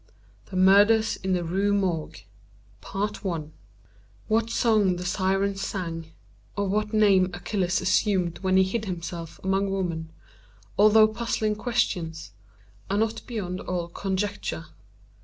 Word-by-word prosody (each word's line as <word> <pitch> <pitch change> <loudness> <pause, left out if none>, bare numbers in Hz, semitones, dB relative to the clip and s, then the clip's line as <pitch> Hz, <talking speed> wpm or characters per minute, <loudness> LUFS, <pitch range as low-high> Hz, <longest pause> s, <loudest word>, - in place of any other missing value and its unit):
THE 190 - -9
MURDERS 205 +4 +5
IN 190 0 -2
THE 180 -1 0
RUE 195 +4 +1
MORGUE 180 -6 -2 2.0
What 225 +1 +1
song 215 -6 +2
the 180 0 -6
Syrens 195 +1 0
sang, 165 -5 -4 0.5
or 200 0 0
what 210 +2 0
name 200 -4 +4
Achilles 180 0 -1
assumed 185 -2 +1
when 190 -1 +2
he 190 - +6
hid 215 +4 -2
himself 170 -3 -6
among 195 +1 +1
women, 170 -4 -2 0.7
although 215 +1 +6
puzzling 220 -1 -1
questions, 195 - -2 0.6
are 200 - 0
not 225 +1 0
beyond 190 -6 -4
all 175 -2 -3
conjecture. 190 - -3
195 Hz, 120 wpm, -26 LUFS, 180-210 Hz, 2.0 s, he